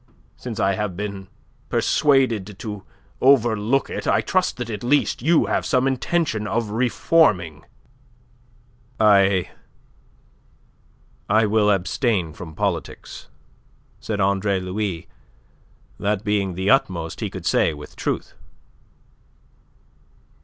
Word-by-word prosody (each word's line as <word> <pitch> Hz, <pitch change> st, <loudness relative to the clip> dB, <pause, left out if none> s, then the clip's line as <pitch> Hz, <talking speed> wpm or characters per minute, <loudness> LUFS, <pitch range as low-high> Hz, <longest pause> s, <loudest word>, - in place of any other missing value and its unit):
Since 120 Hz, -4 st, -7 dB
I 95 Hz, 0 st, +2 dB
have 95 Hz, -2 st, -3 dB
been 100 Hz, -2 st, -5 dB, 0.4 s
persuaded 115 Hz, -9 st, +1 dB
to 105 Hz, -2 st, -7 dB, 0.4 s
overlook 120 Hz, -1 st, +3 dB
it, -, -, -5 dB
I -, -, +3 dB
trust 185 Hz, 0 st, 0 dB
that 120 Hz, -2 st, -5 dB
at 105 Hz, 0 st, -6 dB
least 140 Hz, 0 st, +1 dB
you 160 Hz, +5 st, +3 dB
have -, -, 0 dB
some 130 Hz, -2 st, +1 dB
intention 135 Hz, -4 st, -1 dB
of 110 Hz, -1 st, -2 dB
reforming." 105 Hz, -, +2 dB, 1.4 s
"I... 100 Hz, -3 st, +4 dB, 1.8 s
I 110 Hz, +2 st, +4 dB
will 105 Hz, 0 st, +2 dB
abstain 95 Hz, -, 0 dB
from 80 Hz, -2 st, -10 dB
politics," -, -, -4 dB, 0.7 s
said 105 Hz, -2 st, -4 dB
Andre 100 Hz, 0 st, +1 dB
Louis, 95 Hz, -2 st, -4 dB, 0.9 s
that 105 Hz, 0 st, -1 dB
being 100 Hz, -3 st, -1 dB
the 95 Hz, +2 st, +1 dB
utmost 90 Hz, -, 0 dB
he -, -, -3 dB
could -, -, -9 dB
say -, -, +2 dB
with 75 Hz, -1 st, -11 dB
truth. -, -, -3 dB
105 Hz, 110 wpm, -22 LUFS, 95-120 Hz, 1.8 s, I